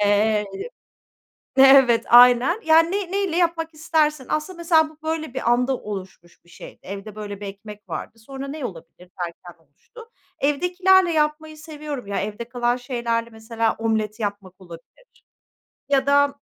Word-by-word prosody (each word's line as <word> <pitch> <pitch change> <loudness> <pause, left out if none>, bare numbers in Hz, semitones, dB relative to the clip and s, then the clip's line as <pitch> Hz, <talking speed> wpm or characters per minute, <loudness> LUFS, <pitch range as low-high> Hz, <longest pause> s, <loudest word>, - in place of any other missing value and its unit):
Eee 210 +1 +2 1.1
Evet, 270 -3 +6
aynen. 250 - +6
Yani 325 +1 +5
ney 390 -2 -3
neyle 390 -4 -1
yapmak 330 -2 0
istersin 305 -3 0
aslında 310 +4 -3
mesela 325 -2 +3
bu 310 - -20
böyle 315 -4 -4
bir 260 - -1
anda 250 +2 +1
oluşmuş 190 -5 -9
bir - - -26
şey - - -12
evde 200 +2 -8
böyle 205 -1 -7
bir 205 - -6
ekmek 205 +1 -11
vardı, 225 - -7
sonra 270 +4 -8
ne 290 -1 -6
olabilir 180 -1 -10
derken 170 -1 -8
oluştu. 455 - -17 0.3
Evdekilerle 360 +5 +2
yapmayı 310 0 -1
seviyorum 300 -6 -7
ya, 200 - -2
evde 215 +3 -5
kalan 245 0 0
şeylerle 235 -2 -3
mesela 225 0 -2
omlet 220 -1 -2
yapmak 200 -3 -5
olabilir 175 - -16 0.6
ya 275 -1 +2
da 285 0 +3
250 Hz, 145 wpm, -22 LUFS, 210-315 Hz, 1.1 s, Evet